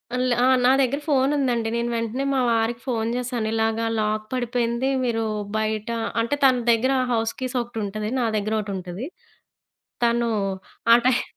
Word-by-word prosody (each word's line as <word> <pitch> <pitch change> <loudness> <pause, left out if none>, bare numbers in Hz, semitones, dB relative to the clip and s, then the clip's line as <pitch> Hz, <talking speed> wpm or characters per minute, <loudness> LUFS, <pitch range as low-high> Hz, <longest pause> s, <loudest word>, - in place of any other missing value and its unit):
అల్ 250 0 0 0.2
ఆ! - - +5 0.2
నా 255 - +6
దగ్గర 275 +2 +1
ఫోను 275 -1 +2
ఉందండి. 240 -5 0
నేను 235 0 -1
వెంటనే 230 +4 -2
మా 265 - +2
వారికి 230 +1 0
ఫోను 225 -2 -1
జేశాను 245 -3 -2
ఇలాగా 225 0 0
లాక్ 215 0 -1
పడిపోయింది. 245 0 0
మీరు 230 -2 0 0.3
బయట 215 +1 -2 0.3
అంటే, 235 +5 +1
తన 255 -2 +5
దగ్గర 235 +3 +2 0.2
హౌస్ 225 -1 0
కీస్ 255 0 -4
ఒకటుంటది, 215 -2 -4
నా 245 - +1
దగ్గర 215 +1 -2
ఒకటుంటది. 195 +3 -5 1.0
తను 235 0 +2 0.6
ఆ - - +11
టైమ్ 255 -1 +3
235 Hz, 155 wpm, -23 LUFS, 220-250 Hz, 1.0 s, ఆ